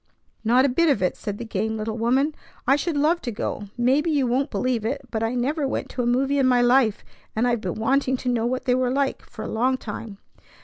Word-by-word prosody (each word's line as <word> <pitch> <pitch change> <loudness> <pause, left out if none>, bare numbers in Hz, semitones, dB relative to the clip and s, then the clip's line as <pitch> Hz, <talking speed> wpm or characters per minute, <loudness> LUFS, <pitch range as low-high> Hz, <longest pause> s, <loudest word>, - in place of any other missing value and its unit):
"Not 245 +4 +4
a - - +3
bit 335 +6 +3
of 220 -10 +2
it!" 180 - +1
said 205 -1 -5
the 235 - -6
game 220 +1 -2
little 215 0 -3
woman. 260 +6 +1 0.3
"I 270 - +5
should 300 +1 -1
love 320 +4 +2
to 245 - -4
go. 205 -1 -4
Maybe 265 +7 +2
you 290 -4 +2
won't 260 +4 0
believe 250 -4 -1
it, 270 +6 -2
but 220 - -2
I 225 +2 -1
never 275 +4 0
went - - -3
to 250 - -3
a 240 - 0
movie 270 +3 +2
in 265 - +4
my 250 -1 +4
life, 245 -3 +3 0.3
and 225 +3 +2
I've 240 -2 0
been 180 -4 -3
wanting 265 +3 +1
to 250 - -3
know 235 -1 +1
what 255 +1 -2
they 250 - +3
were 255 0 +1
like 275 +1 0
for 220 - -10
a - - -4
long 255 +4 +1
time." 210 -3 -7
250 Hz, 250 wpm, -24 LUFS, 225-275 Hz, 0.3 s, I